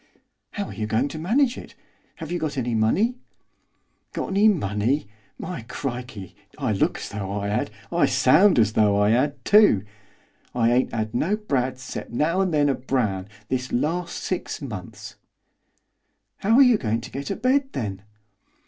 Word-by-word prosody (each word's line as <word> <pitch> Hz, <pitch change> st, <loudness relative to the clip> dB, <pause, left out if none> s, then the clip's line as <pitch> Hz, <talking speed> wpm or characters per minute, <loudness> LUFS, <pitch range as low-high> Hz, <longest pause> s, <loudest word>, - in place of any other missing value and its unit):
'How 205 Hz, -, -3 dB
are -, -, -8 dB
you 110 Hz, -1 st, -3 dB
going 115 Hz, +6 st, 0 dB
to 155 Hz, -, -7 dB
manage 240 Hz, -, +1 dB
it, -, -, -13 dB, 0.4 s
have 160 Hz, -1 st, -8 dB
you 175 Hz, -, -1 dB
got 155 Hz, -3 st, -3 dB
any 120 Hz, -2 st, -1 dB
money?' 200 Hz, -, +1 dB, 0.9 s
'Got -, -, -3 dB
any 200 Hz, +2 st, +4 dB
money? 120 Hz, -, +1 dB, 0.3 s
My 170 Hz, -7 st, -6 dB
crikey! 120 Hz, -8 st, -6 dB, 0.2 s
I -, -, -1 dB
look -, -, +1 dB
as -, -, -6 dB
though 100 Hz, -2 st, -5 dB
I 100 Hz, 0 st, -2 dB
'ad, 105 Hz, -, -1 dB, 0.2 s
I -, -, +3 dB
sound 180 Hz, +2 st, +5 dB
as 110 Hz, -2 st, +3 dB
though 105 Hz, -2 st, +3 dB
I 105 Hz, +1 st, +3 dB
'ad 130 Hz, +2 st, 0 dB
too! 205 Hz, -, +5 dB, 0.7 s
I 115 Hz, -1 st, +3 dB
ain't 125 Hz, +2 st, +2 dB
'ad 110 Hz, -1 st, -3 dB
no 175 Hz, +12 st, +1 dB
brads, 130 Hz, -10 st, -2 dB
'cept -, -, -6 dB
now 165 Hz, +9 st, +1 dB
and 190 Hz, -2 st, 0 dB
then 145 Hz, -2 st, +3 dB
a 140 Hz, -, +3 dB
brown, 115 Hz, -8 st, -1 dB, 0.2 s
this 125 Hz, 0 st, -2 dB
larst 170 Hz, +7 st, -2 dB
six 185 Hz, -, -3 dB
months.' 105 Hz, -, -8 dB, 1.2 s
'How 220 Hz, +4 st, +2 dB
are 275 Hz, -, +8 dB
you 245 Hz, -4 st, +4 dB
going 115 Hz, -1 st, -1 dB
to -, -, -10 dB
get 140 Hz, +2 st, -5 dB
a 195 Hz, -, -1 dB
bed 265 Hz, +4 st, +1 dB
then? 100 Hz, -5 st, -4 dB
130 Hz, 175 wpm, -24 LUFS, 110-180 Hz, 1.2 s, are